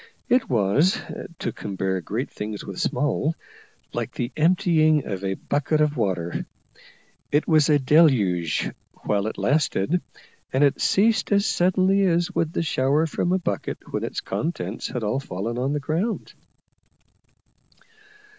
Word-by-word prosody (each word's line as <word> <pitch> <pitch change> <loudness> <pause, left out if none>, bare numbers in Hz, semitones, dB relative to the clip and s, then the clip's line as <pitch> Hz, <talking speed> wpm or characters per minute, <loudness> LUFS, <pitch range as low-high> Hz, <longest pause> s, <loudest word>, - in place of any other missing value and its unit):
It 250 +1 +3
was, 120 - +3 0.4
to - - -3
compare 95 -2 -3
great 115 - -4
things 105 0 -6
with 95 - -7
small, 150 +2 0 0.6
like - - -4
the 120 +1 -3
emptying 155 -2 +3
of 95 -2 -4
a 95 0 -1
bucket 145 +6 -1
of 150 -1 +2
water. 90 -7 -2 0.8
It 145 +1 +2
was 155 -3 +4
a 150 - +6
deluge 125 - +3 0.3
whilst 105 0 +1
it - - -9
lasted, 150 - +1 0.5
and 135 +2 +2
it 140 - +2
ceased 200 +9 +2
as 200 0 +3
suddenly 185 +1 +2
as 175 -1 +1
would 165 0 -1
the - - 0
shower 145 +1 +2
from 175 +2 -1
a 185 - +3
bucket 105 - -4
when - - -1
its - - -3
contents 115 - -3
had 125 - -4
all 105 +6 0
fallen 115 -2 -4
to 130 +2 0
the 150 - 0
ground. 165 +10 -2
145 Hz, 145 wpm, -24 LUFS, 105-165 Hz, 0.8 s, a